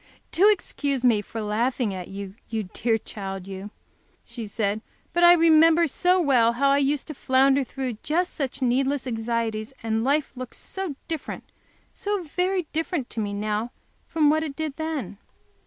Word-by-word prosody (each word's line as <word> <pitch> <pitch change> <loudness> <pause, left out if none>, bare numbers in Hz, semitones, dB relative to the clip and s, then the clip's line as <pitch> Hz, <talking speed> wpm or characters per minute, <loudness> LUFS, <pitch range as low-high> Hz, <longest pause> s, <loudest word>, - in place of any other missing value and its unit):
"Do 395 +5 +5
excuse 285 - 0
me 225 -4 +4
for 225 +2 -6
laughing 220 +1 0
at 185 -2 -6
you, 195 0 -7 0.2
you 220 -1 -2
dear 225 +4 0
child 195 -3 -7
you!" 195 +1 -7 0.6
she 230 -3 -7
said. 205 0 -1 0.3
"But 345 - +2
I 345 0 +10
remember 330 0 +6
so 360 +5 +2
well 250 -8 +4
how 275 +3 +3
I 280 - +4
use 285 0 +1
to 310 - -7
flounder 270 +1 +3
through 255 -3 -5
just 350 +4 0
such 275 -1 -3
needless 265 +2 +1
anxieties, 225 -1 -2
and 225 0 0
life 285 +3 +1
looks 255 -1 -7
so 380 -7 -4
different, 320 -3 -5 0.5
so 410 -2 -2
very 360 +4 0
different, 320 -4 -2
to - - -4
me 205 -2 -1
now 210 +3 -2 0.4
from 305 -2 +3
what 310 +1 +2
it 300 -3 -4
did 310 -3 -3
then! 305 - -4
265 Hz, 170 wpm, -25 LUFS, 220-315 Hz, 0.6 s, I